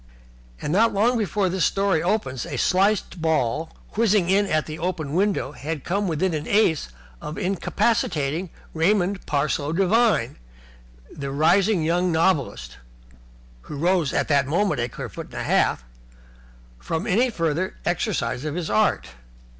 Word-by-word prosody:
And 150 - -3
not 225 +2 +3
long 230 +5 +3
before 210 -3 0
this 185 -1 -1
story 195 -5 +1
opens 170 - -1
a - - -5
sliced 190 -2 +1
ball, 160 -1 0 0.3
whizzing 205 -5 +2
in 200 +1 +3
at 155 -4 0
the 155 0 -7
open 165 -4 -3
window, 195 -5 0
had 150 0 -5
come 200 +3 -1
within 170 +2 0
an 155 -1 -3
ace 200 -7 +2 0.3
of 150 - -6
incapacitating 185 - 0 0.2
Raymond 190 +3 +1
Parsloe 145 0 0
Devine, 195 - +2 0.8
the 140 -1 -5
rising 175 +6 +3
young 175 +3 +1
novelist 155 - 0 0.9
(who 150 - -7
rose 170 -2 +1
at - - 0
that 140 -3 +2
moment 170 -3 +1
a 120 - -2
clear - - -6
foot - - -8
and - - -14
a - - -3
half) - - +1 1.0
from 160 - -3
any 240 +7 +2
further 165 -2 -1
exercise 165 - -1
of 155 0 -3
his 175 -2 -3
art. 110 -10 +1
170 Hz, 145 wpm, -23 LUFS, 150-195 Hz, 1.0 s, not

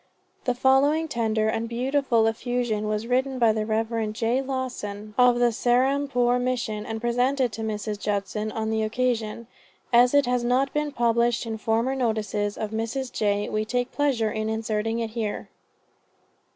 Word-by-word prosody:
The 250 - +1
following 275 +5 +3
tender 220 -5 0
and 225 +1 -1
beautiful 250 -1 +1
effusion 225 -1 -1
was 215 +1 -1
written 260 +2 0
by 230 -3 +4
the 215 0 -2
Rev. 225 0 -1
J. 230 +4 0
Lawson 240 -6 -5
of 250 -1 +5
the 240 0 +3
Serampore 250 +1 +2
Mission 240 -4 -2
and 225 -1 -4
presented 245 +2 +1
to 225 - -5
Mrs. 210 -1 -3
Judson 210 +1 -2
on 220 +1 -2
this 220 0 0
occasion. 230 -1 -1 0.5
As 245 +3 +6
it 285 -2 +5
has 245 0 0
not 255 +3 +1
been 300 0 -1
published 235 -1 +1
in 220 -1 -4
former 225 +4 +1
notices 215 -5 -1
of 215 -1 -4
Mrs. 230 +4 -3
J. 205 -1 0
we 215 0 -1
take 245 +3 -2
pleasure 255 -7 +1
in 215 0 -2
inserting 220 0 -1
it 230 -1 -3
here. 220 -2 -4
230 Hz, 160 wpm, -25 LUFS, 220-250 Hz, 0.5 s, As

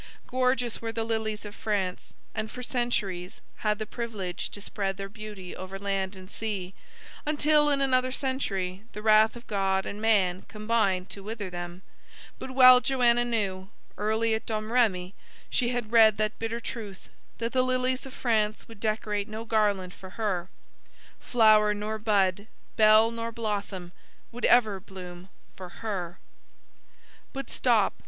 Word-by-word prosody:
Gorgeous 255 -2 0
were 225 -1 -3
the 225 0 -2
lilies 220 -2 -2
of 205 - -7
France, 195 -4 -2 0.2
and 220 0 -3
for 250 +3 -8
centuries 205 -8 -2 0.2
had 210 -1 0
the 215 - -4
privilege 210 -6 -4
to - - -8
spread 195 -1 -3
their 195 0 -5
beauty 205 -3 -9
over 185 +1 -7
land 195 -1 -2
and 185 0 -11
sea, 195 -3 -4 0.5
until, 300 0 +3
in 280 -1 +2
another 255 -1 +2
century, 200 -9 -2
the 210 - -7
wrath 215 +1 +5
of 240 +1 -11
God 195 -2 0
and 205 - -6
man 195 -5 +3
combined 215 -4 0
to 200 - -6
wither 205 -2 -5
them; 175 +1 -7 0.6
but - - -6
well 255 -1 +8
Joanna 240 -3 +3
knew, 200 -5 -2 0.3
early 220 +2 +1
at 220 0 -3
Domrémy 215 -4 +1 0.4
she 240 -2 +2
had 240 -3 -3
read 220 -3 +6
that 215 0 -1
bitter 230 +1 -2
truth, 215 -5 -7 0.3
that 230 0 -2
the 255 - +3
lilies 255 0 0
of 260 - -11
France 215 -3 0
would 225 -3 -13
decorate 215 -1 -1
no 220 +1 -6
garland 205 -5 +1
for 190 - -11
her. 190 -5 -1 0.7
Flower 215 -3 +4
nor 215 +1 -3
bud, 200 -2 +1 0.3
bell 215 +1 +6
nor 230 0 -4
blossom, 205 -5 -4 0.4
would 240 +1 -3
ever 220 -5 +4
bloom 180 -2 -10 0.3
for 185 -1 -8 0.2
her. 180 -5 -3 1.2
But 275 0 -5
stop. 230 -6 +3
215 Hz, 150 wpm, -28 LUFS, 195-230 Hz, 1.2 s, well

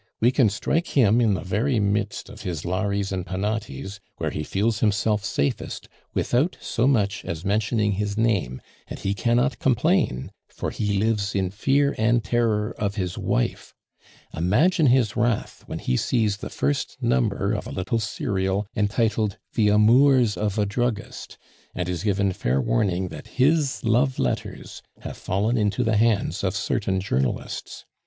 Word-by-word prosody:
We 120 +3 +4
can 130 -5 +4
strike 155 - -1
him 120 -2 +5
in 110 -4 +3
the - - -5
very 110 +7 0
midst 100 0 -1
of - - -11
his 85 -4 -4
Lares 100 +2 -1
and 95 -2 -2
Penates, 100 +1 -4 0.2
where - - -2
he - - -3
feels 105 +7 0
himself 105 -1 +1
safest, 70 -8 -2 0.3
without 140 +9 +1
so 115 +3 0
much 105 -7 +1
as 85 0 -5
mentioning 105 +1 +1
his 100 +1 -2
name; 100 - 0 0.2
and - - -7
he 100 - -1
cannot 120 +6 +1
complain, 135 - +1 0.2
for - - -4
he 105 -2 -1
lives 105 -1 0
in 95 -2 0
fear 140 +7 +2
and 115 +1 +3
terror 110 0 0
of 100 -1 -1
his 90 -4 -2
wife. - - -2 0.6
Imagine 145 - +3
his 125 -5 +3
wrath 120 -1 -1
when - - -5
he 65 - -1
sees 110 -4 +1
the - - -7
first 70 +1 -2
number 65 -1 +1
of - - -3
a - - -7
little 95 +5 -1
serial 95 -1 -1
entitled 110 -1 0 0.2
the 110 -2 +2
Amours 115 +3 +5
of 105 -1 -2
a 105 - +2
Druggist, 110 +1 -3 0.4
and 90 -1 -2
is 90 0 -3
given 100 -2 +1
fair 65 -5 0
warning 90 +10 0
that - - -9
his 145 +1 +2
love 125 +4 +2
letters 65 - -3 0.2
have - - -6
fallen 105 +6 0
into 105 +3 +1
the 110 -2 +1
hands 105 -5 +1
of 95 0 0
certain 100 -1 -1
journalists. 70 -10 -3
105 Hz, 160 wpm, -24 LUFS, 95-115 Hz, 0.6 s, him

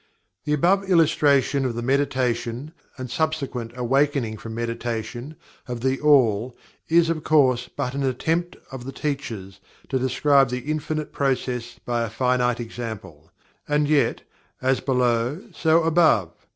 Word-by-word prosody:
The 150 - 0
above 190 +6 +2
illustration 145 -5 +3
of 125 -3 -2
the 120 - -3
"meditation," 130 0 -1 0.3
and 130 -1 -5
subsequent 135 -5 -2
"awakening 130 -2 +1
from 110 +1 -8
meditation," 120 +3 -4 0.3
of 120 -2 -5
THE 130 +1 0
ALL, 125 -5 +3 0.3
is 165 0 +4
of 155 -2 -3
course 130 -5 +3
but 125 - -4
an 140 - -2
attempt 165 +7 -1
of 130 -2 -7
the 135 - -5
teachers 115 -10 -5 0.3
to 130 - 0
describe 135 +1 +3
the 125 +4 -3
Infinite 155 0 -3
process 125 -3 -2
by 120 -1 0
a 115 - -2
finite 125 +1 +1
example. 110 -9 -7 0.4
And, 150 0 +1
yet: 150 -1 +2 0.4
"As 130 0 +1
Below, 125 +2 +1
so 160 0 +3
Above." 160 - +3
130 Hz, 140 wpm, -23 LUFS, 120-150 Hz, 0.4 s, is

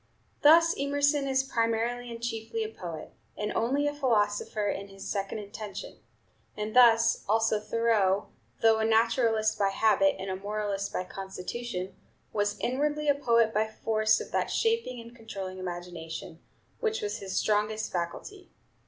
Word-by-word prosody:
Thus 330 +3 +7
Emerson 285 0 +1
is 265 0 +2
primarily 235 0 -1
and 230 - -7
chiefly 225 -1 -3
a 215 - -4
poet, 170 -7 -8 0.2
and 210 0 -2
only 275 +6 +1
a 290 - 0
philosopher 210 -6 0
in 200 0 -3
his 195 0 -10
second 195 +1 -2
intention; 205 -1 -8 0.6
and 215 +1 -4
thus 230 -2 +6
also 220 0 +3
Thoreau, 210 -3 +1 0.3
though 225 -1 +5
a - - +1
naturalist 225 0 +2
by 200 -1 +3
habit, 225 +8 +3
and 190 0 -4
a - - -2
moralist 200 0 -3
by - - -2
constitution, 190 +1 -5 0.4
was 205 0 0
inwardly 295 +4 0
a - - +6
poet 235 -5 +2
by 215 +1 +2
force 220 0 +1
of - - -8
that - - 0
shaping 450 - 0
and 235 +1 -11
controlling 195 -5 -7
imagination, 175 -3 -6 0.4
which 445 -1 -1
was 415 - -3
his 190 -1 -5
strongest 215 +1 0
faculty. 270 - -5
220 Hz, 150 wpm, -29 LUFS, 200-245 Hz, 0.6 s, Thus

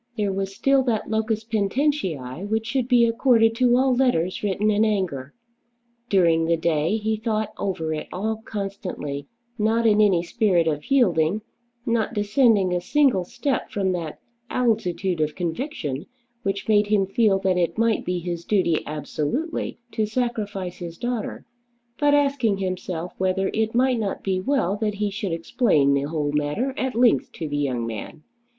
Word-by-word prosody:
There 205 -2 0
was 195 0 -3
still 275 +5 +3
that 225 -3 -1
"locus 220 0 0
poenitentiæ" 200 - -1
which 220 +1 0
should 245 +1 -1
be 245 -2 +5
accorded 230 -1 +3
to 245 -1 +4
all 260 0 +3
letters 185 -9 +1
written 205 +1 +1
in 210 +1 +3
anger. 180 -11 -1 0.8
During 165 -4 +3
the 165 0 +2
day 160 +4 +1
he 220 0 -1
thought 215 -1 -2
over 165 -5 -2
it 155 - -5
all 220 +4 -2
constantly, 195 -9 -5 0.3
not 225 +2 +2
in 215 -1 +5
any 190 -5 +4
spirit 185 -3 +2
of 150 -1 -2
yielding, 205 - +2 0.4
not 230 -2 0
descending 205 -2 +3
a 175 - 0
single 260 -2 +2
step 250 +6 -2
from 195 -2 0
that 170 -4 -4 0.3
altitude 190 -7 0
of 150 0 -1
conviction 170 - -4 0.3
which 195 -2 -3
made 210 -1 +4
him 205 -2 +2
feel 195 0 +2
that 190 -1 +1
it 170 +3 0
might 230 0 +2
be 180 0 -1
his 175 -1 -4
duty 180 -5 +1
absolutely 155 - -3
to 220 -1 -1
sacrifice 210 -6 -3
his 170 -2 -7
daughter, 240 -2 -4 0.5
but 290 0 +4
asking 275 -8 +2
himself 185 -2 -4
whether 190 +1 0
it 220 +1 0
might 255 -1 +3
not 205 -3 -3
be 190 -1 0
well 200 -4 0
that 210 -1 -1
he 205 0 -1
should 200 -2 -3
explain 165 - +2
the 140 +1 0
whole 150 -2 -1
matter 150 - -1
at 260 -4 -2
length 240 0 +3
to 160 - -5
the 145 0 -3
young 130 -5 -1
man. 115 +6 -7
200 Hz, 165 wpm, -24 LUFS, 170-230 Hz, 0.8 s, be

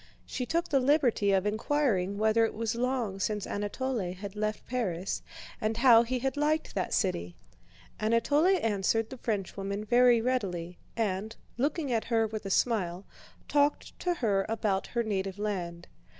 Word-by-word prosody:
She 250 - -4
took 335 +1 0
the 275 - +3
liberty 255 -7 +3
of 190 0 +2
inquiring 210 -3 0
whether 220 +2 +3
it 225 - 0
was 225 +1 -1
long 240 -5 -1
since 210 0 -1
Anatole 205 -1 -2
had 200 +1 -8
left 215 0 -2
Paris 195 -7 -2 0.4
and 220 +1 0
how 235 -2 +7
he 245 +2 -1
had 265 +3 -1
liked 305 +2 0
that - - -2
city. 90 - -1 0.6
Anatole 230 +9 +3
answered 220 - 0
the 260 - -7
Frenchwoman 200 -1 -3
very 245 +1 +5
readily 190 -8 -2 0.2
and, 215 0 -1 0.2
looking 285 +2 -1
at 225 -2 0
her 225 -1 +2
with 215 -2 -5
a - - -4
smile, 190 -4 0 0.4
talked 290 0 +1
to 355 -1 0
her 205 -9 +1
about 210 -3 0
her 235 -1 -1
native 195 -3 -2
land. 175 -5 -4
220 Hz, 155 wpm, -29 LUFS, 195-250 Hz, 0.6 s, how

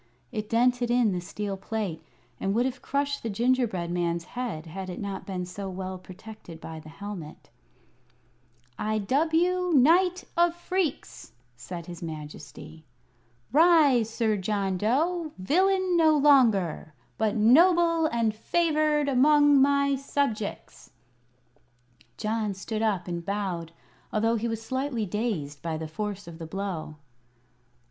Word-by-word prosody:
It 215 0 -4
dented 245 +1 +2
in 240 -3 +3
the 180 -1 -2
steel 200 +2 -5
plate, 190 -6 -4 0.4
and 195 +1 -1
would 240 +2 +2
have 260 0 -3
crushed 280 0 -1
the 230 - -3
gingerbread 225 -6 0
man's 170 -1 -1
head 215 -6 -5
had 185 +3 -7
it 180 - -6
not 200 -1 -5
been 185 -2 -3
so 190 +2 -6
well 185 0 -5
protected 185 -2 -12
by 160 0 -8
the 155 0 -12
helmet. 170 -2 -9 1.3
"I 215 0 0
dub 270 +10 +1
you 360 +2 +2
Knight 355 +7 +4
of 345 0 +3
Phreex," 345 - -3 0.2
said 170 +7 -8
his 175 -1 -9
Majesty. 155 0 -9 0.7
"Rise, 295 -7 +5
Sir 220 -2 0
John 195 -1 -1
Dough 310 - 0
villain 370 - +2
no 315 -2 +5
longer, 225 - +3 0.2
but 220 0 +1
noble 335 +8 +5
and 230 -5 0
favored 305 +3 +1
among 290 +1 +5
my 280 0 +3
subjects!" 270 -6 -3 1.3
John 215 -2 -2
stood 215 +3 -4
up 200 -5 0
and 170 -1 -4
bowed, 185 -4 -3 0.4
although 225 +2 +1
he 230 +1 -1
was 225 -1 -4
slightly 260 -2 -2
dazed 180 - -3
by 165 -2 -3
the 160 0 -5
force 205 +3 -5
of 165 -1 -10
the 165 - -6
blow. 185 -4 -5
220 Hz, 135 wpm, -27 LUFS, 185-280 Hz, 1.3 s, Rise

